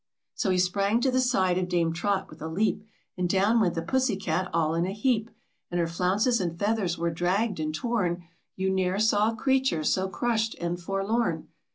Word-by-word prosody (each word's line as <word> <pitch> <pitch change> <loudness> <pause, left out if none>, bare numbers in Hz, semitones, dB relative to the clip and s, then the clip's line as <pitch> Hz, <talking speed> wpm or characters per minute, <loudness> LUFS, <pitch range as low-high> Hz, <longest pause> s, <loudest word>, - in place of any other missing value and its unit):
So - - -1
he 185 - +2
sprang 200 +4 +2
to 265 - +2
the 255 - +2
side 190 -8 +2
of 180 -1 -2
Dame 170 -2 +1
Trot 195 +3 -1
with 155 - -15
a 160 - -4
leap, 205 +6 0 0.4
And 180 -1 0
down 200 +5 +3
went 185 -6 +1
the 165 - -2
pussy 255 +4 +1
cat 185 -1 -2
all 160 -1 +1
in 170 +2 0
a 190 - -3
heap, 225 0 0 0.4
And 175 - -2
her 170 - +2
flounces 190 +8 +1
and 170 -2 -3
feathers 200 -3 0
were 170 0 -1
dragged 180 +4 0
and 155 0 -1
torn, 180 -2 -1 0.3
You 190 0 0
ne'er 190 0 0
saw 215 0 +3
a - - -7
creature 265 - +1
so 190 +5 +1
crushed 225 +1 -1
and 175 0 -2
forlorn. 195 +6 -1
190 Hz, 205 wpm, -27 LUFS, 175-220 Hz, 0.4 s, down